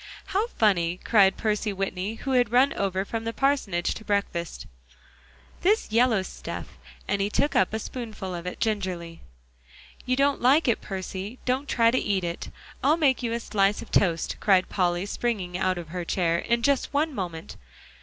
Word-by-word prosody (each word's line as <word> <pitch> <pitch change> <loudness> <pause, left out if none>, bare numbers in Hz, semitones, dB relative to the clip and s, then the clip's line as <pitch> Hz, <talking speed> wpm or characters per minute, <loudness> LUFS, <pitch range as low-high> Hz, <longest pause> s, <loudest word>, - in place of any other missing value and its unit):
"How 410 +4 +2
funny," 180 - +1
cried 195 -4 +4
Percy 215 -1 0
Whitney, 195 +1 -3
who 270 +4 -4
had 245 -4 +3
run 255 +3 +4
over 190 -1 -1
from 225 +2 -4
the 225 - -2
parsonage 230 -10 +1
to - - -9
breakfast, 200 -5 -2 1.0
"this 410 - +2
yellow 230 -3 +3
stuff - - -7
is." - - -21 0.3
And 200 -1 0
he 200 - +1
took 285 +7 0
up 190 - +3
a 220 - -1
spoonful 220 -5 -6
of 175 0 -5
it 180 - -5
gingerly. 185 -6 -2 0.9
"You 255 - +2
don't 280 +1 +2
like 275 +5 +4
it, 235 - +2
Percy; 195 +3 -5
don't 260 +3 -1
try 230 -1 +4
to 255 - +2
eat 195 -3 0
it. 170 0 -4 0.3
I'll 295 +4 +4
make 275 -6 +2
you 235 -2 -2
a 235 - -1
slice 205 -2 +1
of - - -16
toast," 170 -4 +1
cried 190 -3 +3
Polly, 175 -1 0
springing 205 -5 -2
out 185 0 0
of 170 -3 -7
her 180 +1 -4
chair, 170 -1 +1
"in 235 0 0
just 280 +1 +2
one 305 +1 +1
moment." 175 -7 -5
205 Hz, 185 wpm, -26 LUFS, 185-245 Hz, 1.0 s, cried